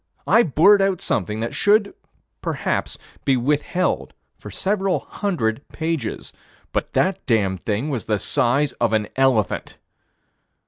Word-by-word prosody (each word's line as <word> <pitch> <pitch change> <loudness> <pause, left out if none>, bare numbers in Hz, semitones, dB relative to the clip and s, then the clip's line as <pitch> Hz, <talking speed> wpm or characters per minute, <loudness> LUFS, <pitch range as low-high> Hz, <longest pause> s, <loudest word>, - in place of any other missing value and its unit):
I 230 - +5
blurt 195 - +5
out 195 -2 +1
something 105 +2 -2
that 115 - -3
should, 205 0 +3 0.5
perhaps, - - -2 0.3
be 135 -2 +2
withheld 150 +8 -1 0.2
for - - -11
several 195 -1 0
hundred 140 - -2
pages 160 -8 -4 0.4
but - - -2
that 190 +1 +1
damned 100 -7 +1
thing 115 +8 -1
was 125 -5 -4
the 105 - +1
size 135 +8 +2
of 115 -2 +2
an 105 -1 0
elephant. 130 -6 +1
140 Hz, 130 wpm, -22 LUFS, -, 0.5 s, I